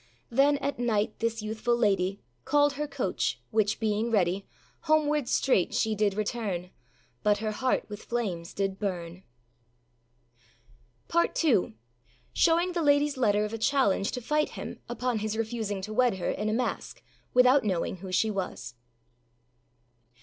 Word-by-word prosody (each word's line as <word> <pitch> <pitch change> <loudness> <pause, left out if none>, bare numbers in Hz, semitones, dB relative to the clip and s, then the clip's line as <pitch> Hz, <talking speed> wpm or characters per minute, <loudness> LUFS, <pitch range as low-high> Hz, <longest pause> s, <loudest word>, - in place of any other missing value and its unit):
Then, 280 +4 +4
at 280 -2 -3
night, 220 -4 0
this 230 -1 -1
youthful 220 +2 0
lady 195 -3 +1 0.2
Called 290 +1 +3
her 300 +1 -3
coach, 280 - -2
which 215 -1 +1
being 220 +1 0
ready, 195 -3 +1 0.4
Homewards 300 -4 +2
straight 225 -9 +2
she 220 - +1
did 205 -2 +1
return; 200 -4 -3 0.5
But 210 -1 +3
her 215 +1 -2
heart 255 +4 0
with 210 0 -9
flames 190 -9 -3
did 195 -1 -2
burn. 180 -3 -4 1.9
PART 340 0 +1
II. 215 - +2 0.6
SHOWING 340 +2 +3
THE 345 -1 -1
LADYâS 290 -1 +3
LETTER 210 -5 +2
OF 210 - -6
A - - -2
CHALLENGE 225 -6 +2
TO 250 - -4
FIGHT 300 +5 +1
HIM - - -6
UPON 240 -1 -1
HIS 215 +1 -3
REFUSING 220 -3 -2
TO 215 +2 -5
WED 245 -1 +3
HER 185 - -2
IN 215 +1 -2
A - - 0
MASK, 250 +2 -3 0.3
WITHOUT 250 +2 +6
KNOWING 190 -2 -1
WHO 185 +1 -8
SHE 215 +4 +2
WAS. 180 - -4
220 Hz, 150 wpm, -28 LUFS, 200-260 Hz, 1.9 s, WITHOUT